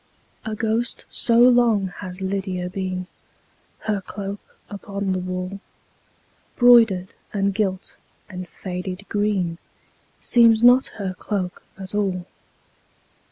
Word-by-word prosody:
A 220 -1 -3
ghost 225 +2 -1
so 230 -1 +2
long 240 -5 +5
has 185 -1 -6
Lydia 190 -2 -2
been, 185 -1 -3 0.8
Her 210 -2 -1
cloak 200 +1 -6 0.3
upon 200 -1 -4
the 185 - 0
wall, 185 +2 -4 1.0
Broidered, 225 -7 +5 0.2
and 200 -1 +1
gilt, 190 -2 -2 0.3
and 180 -2 -8
faded 185 +1 -6
green, 200 -5 0 0.6
Seems 230 -2 +4
not 250 +2 +7
her 195 -3 -3
cloak 185 -1 -4 0.2
at 190 0 -8
all. 190 -4 -1
195 Hz, 110 wpm, -22 LUFS, 185-220 Hz, 1.0 s, not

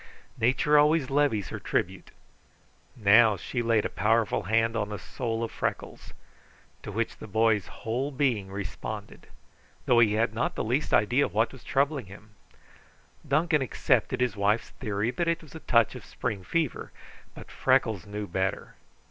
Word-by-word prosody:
Nature 135 +5 +3
always 150 -2 +3
levies 135 -8 +1
her - - -6
tribute. 95 0 -2 0.9
Now 110 -1 +5
she 120 +7 -3
laid 115 -2 +2
a - - -1
powerful 110 +2 +1
hand 115 +1 +2
on 105 -2 -1
the 105 - -4
soul 115 +3 -4
of 115 - -4
Freckles, - - -5 0.7
to - - -7
which 115 +3 -2
the - - -10
boy's 110 -2 +2
whole 125 +6 -3
being 130 -8 0
responded, 100 +1 -7 0.6
though 120 - +4
he 110 -3 +4
had 110 0 +1
not 115 - -1
the - - -2
least 125 +7 -1
idea 125 +7 +3
what 110 +2 0
was 130 - -14
troubling 140 -3 0
him. 105 +3 -14 1.0
Duncan 155 +2 +2
accepted 130 0 0
his 125 -4 +1
wife's 105 +3 +1
theory 105 -1 -2
that 170 +5 -2
it 170 0 0
was 155 - -15
a 160 - -8
touch 115 -7 +2
of 125 -4 -9
spring 105 -5 -4
fever, 155 - -2 0.4
but - - -11
Freckles 115 -7 +1
knew 105 0 -5
better. 95 +1 -3
115 Hz, 160 wpm, -27 LUFS, 105-130 Hz, 1.0 s, Now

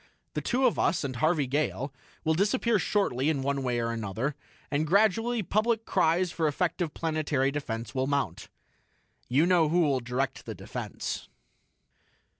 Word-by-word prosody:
The - - -2
two 260 +1 +1
of 245 - +2
us, 165 - +2
and 130 -3 -3
Harvey 155 0 +2
Gale, 140 0 -1 0.3
will 160 - +2
disappear 210 +5 +2
shortly 155 -10 +1
in 140 -4 0
one 140 0 0
way 125 -2 0
or 115 0 -1
another, 115 +5 -2 0.4
and 150 +2 +1
gradually 220 +5 +3
public 220 +4 +1
cries 175 0 +2
for 160 -2 0
effective 170 +1 -1
planetary 155 -4 0
defense 120 -6 -4
will 130 -1 0
mount. 140 - -1 0.8
"You 140 +6 +4
know 175 -4 +4
who 175 +3 +3
will 140 -5 +2
direct 125 +2 -3
the - - -5
defense." - - -5
155 Hz, 155 wpm, -28 LUFS, 135-180 Hz, 0.8 s, You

